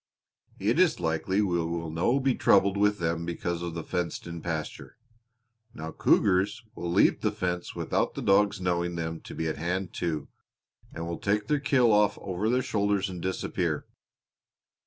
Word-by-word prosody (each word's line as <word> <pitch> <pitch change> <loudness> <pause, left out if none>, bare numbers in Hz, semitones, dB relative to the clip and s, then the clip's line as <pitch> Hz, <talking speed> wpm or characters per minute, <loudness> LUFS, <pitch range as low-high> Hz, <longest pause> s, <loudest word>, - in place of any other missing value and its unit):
It - - +1
is - - +4
likely 90 +5 0
we 90 -3 +1
will 85 -1 -3
no 90 - +2
be 135 -1 +2
troubled 100 -3 +4
with 105 0 +2
them 85 -1 -1
because 85 0 -3
of 85 -1 -4
the 85 - -4
fenced 90 0 -3
in 85 -1 -6
pasture. 80 -3 -5 0.8
Now 80 +1 -6
cougars 100 +5 +2
will 85 -5 -4
leap 95 - +4
the 105 - +1
fence 90 -4 -3
without - - -1
the - - -4
dogs 100 0 +3
knowing 85 -1 -1
them 80 -1 -3
to - - -10
be 80 - -2
at 80 - -2
hand, 90 +2 -2
too, 80 -4 -2 0.6
and 85 - -5
will 85 - -4
take 105 +1 0
their 150 +5 +1
kill 130 -4 +3
off 105 -1 +3
over 95 +3 -2
their 125 +2 +2
shoulders 100 -3 0
and 90 -2 -7
disappear. 95 +1 -2
90 Hz, 175 wpm, -28 LUFS, 85-105 Hz, 0.8 s, is